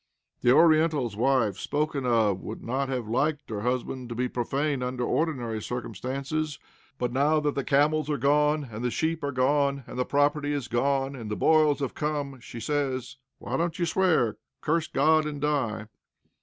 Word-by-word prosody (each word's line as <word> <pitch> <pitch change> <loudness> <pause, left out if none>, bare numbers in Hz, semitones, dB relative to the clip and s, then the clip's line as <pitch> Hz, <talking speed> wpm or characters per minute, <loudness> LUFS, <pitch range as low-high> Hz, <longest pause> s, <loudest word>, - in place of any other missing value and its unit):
The 125 - +4
Oriental's 155 -6 +4
wife 120 -4 +2
spoken 145 -3 -1
of 110 -6 +2
would 110 - -7
not 135 +3 -1
have 125 -4 -3
liked 145 +4 -1
her 105 -2 -3
husband 125 +1 -2
to 120 - -5
be 125 +2 0
profane 135 +3 -1
under 125 0 -2
ordinary 120 -7 -1
circumstances, 135 - -3 0.4
but 125 -2 -2
now 150 +4 +3
that 145 -1 0
the 140 - -2
camels 150 +3 +2
are 150 - 0
gone, 150 +2 +2
and 110 +2 -6
the 125 - +1
sheep 160 +5 -1
are 140 - -1
gone, 140 +1 +1
and - - -7
the - - +3
property 145 +1 +1
is 140 -4 -3
gone, 135 +3 0
and 115 -5 -7
the 105 - -2
boils 155 -1 +3
have 135 - -2
come, 145 -3 -3
she 120 -1 -9
says: 135 0 -2 0.2
"Why - - -3
don't 170 0 -1
you 175 - +1
swear? 160 - +2 0.2
Curse 160 +1 0
God 155 +2 +3
and 145 -1 -5
die!" 130 -7 -1
140 Hz, 180 wpm, -27 LUFS, 125-150 Hz, 0.4 s, The